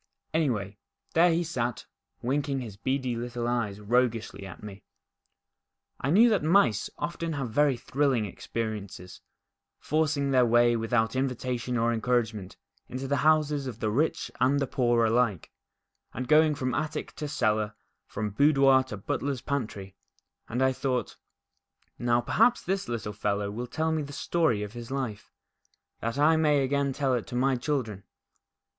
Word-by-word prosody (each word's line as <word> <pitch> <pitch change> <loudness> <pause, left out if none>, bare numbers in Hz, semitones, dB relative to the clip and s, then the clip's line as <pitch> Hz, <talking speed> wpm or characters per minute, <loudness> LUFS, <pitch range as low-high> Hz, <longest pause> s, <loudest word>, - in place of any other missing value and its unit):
Anyway, 105 -11 -1 0.3
there 170 +2 +5
he 165 +1 +1
sat, 125 -7 -3 0.4
winking 140 +2 0
his 115 -6 -7
beady 130 +3 -1
little 120 0 -4
eyes 115 -5 -1
roguishly 115 -2 0
at 95 - -11
me. 100 -2 -9 1.2
I 135 - -2
knew 215 +10 +6
that 210 - +2
mice 155 - +3
often 170 -1 -3
have 135 -6 -3
very 145 0 +3
thrilling 135 -4 0
experiences, 100 -3 -6 0.6
forcing 150 -2 0
their 130 -1 +5
way 120 0 +4
without 115 0 0
inxitation 125 -1 -2
or 115 +1 +2
encouragement 110 -4 -1 0.3
into 130 +2 -5
the 140 +1 +1
houses 150 -1 +2
of 120 -3 -7
the 110 - -1
rich 150 +8 0
and 135 +3 +3
poor 120 -2 +2
alike, 110 -5 +1 0.6
and 130 - -4
going 155 +1 +5
from 130 -2 -2
attic 155 0 -3
to 150 - -4
cellar, 110 -7 0 0.3
from 105 0 -4
boudoir 135 +2 +5
to 125 -5 -7
butler's 130 +6 -3
pantry, 105 -9 -4 0.6
and 125 +3 0
I 130 0 +3
thought, 125 -4 -2 0.8
Now. 120 0 +2
perhaps 240 - +3
this 195 -2 -2
little 110 -3 -3
fellow 100 0 -1
will 120 +4 -5
tell 160 +5 -1
me 160 -1 0
the 145 0 -7
story 140 -9 +1
of 105 0 -7
his 120 -1 -8
life, 130 -6 -4 0.7
that 115 +3 -3
I 155 +3 +4
may 150 -3 +3
again 140 +1 0
tell 135 -1 0
it 120 -3 -2
to 125 - -6
my 130 +2 +2
children." 120 -7 -2
125 Hz, 150 wpm, -28 LUFS, 115-145 Hz, 1.2 s, knew